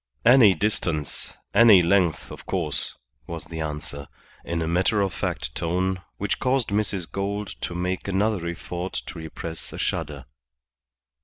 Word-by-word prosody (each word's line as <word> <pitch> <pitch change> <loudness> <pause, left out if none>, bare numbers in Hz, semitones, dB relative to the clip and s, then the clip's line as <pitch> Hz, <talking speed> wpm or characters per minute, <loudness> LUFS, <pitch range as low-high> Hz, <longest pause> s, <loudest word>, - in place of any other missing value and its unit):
"Any 120 -5 +8
distance, 80 -6 -1 0.2
any 105 -4 +8
length, 85 -2 +2
of - - -10
course," - - -2 0.3
was 85 -2 -5
the 80 -1 -7
answer, 75 -2 -5 0.4
in 85 -1 -2
a - - -2
matter 90 +5 +2
of 100 -3 +1
fact - - -3
tone, 90 +3 -1 0.2
which 100 - -1
caused 130 -2 +1
Mrs. 100 -3 0
Gould 100 +1 -2
to 85 - -3
make 90 +2 -2
another 100 -2 +1
effort 85 +2 -4
to 85 - -5
repress 80 0 -6
a - - -6
shudder. 70 -3 -2
90 Hz, 145 wpm, -25 LUFS, 85-100 Hz, 0.4 s, Any